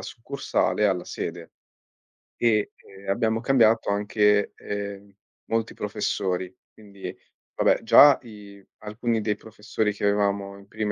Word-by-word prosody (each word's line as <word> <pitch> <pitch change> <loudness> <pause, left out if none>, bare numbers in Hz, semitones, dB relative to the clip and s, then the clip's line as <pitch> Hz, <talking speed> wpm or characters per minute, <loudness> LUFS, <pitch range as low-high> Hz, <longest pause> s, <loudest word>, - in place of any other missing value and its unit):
succursale 120 -3 -1
alla 90 -3 0
sede - - -6 0.8
e, 110 -3 +1
ehm, 95 0 -16
abbiamo 110 +2 0
cambiato 115 -4 +3
anche, 105 0 +2
ehm, 100 0 -6 0.3
molti 115 0 -2
professori. 95 -3 -3 0.2
Quindi, 100 -2 -9 0.4
vabbè - - +2
già 145 -2 +8
i 100 -4 -13
alcuni 110 +2 -2
dei 105 0 0
professori 105 -1 -3
che 105 - -6
avevamo 100 -1 0
in 100 0 -17
prima 110 -1 -3
105 Hz, 120 wpm, -25 LUFS, 100-110 Hz, 0.8 s, già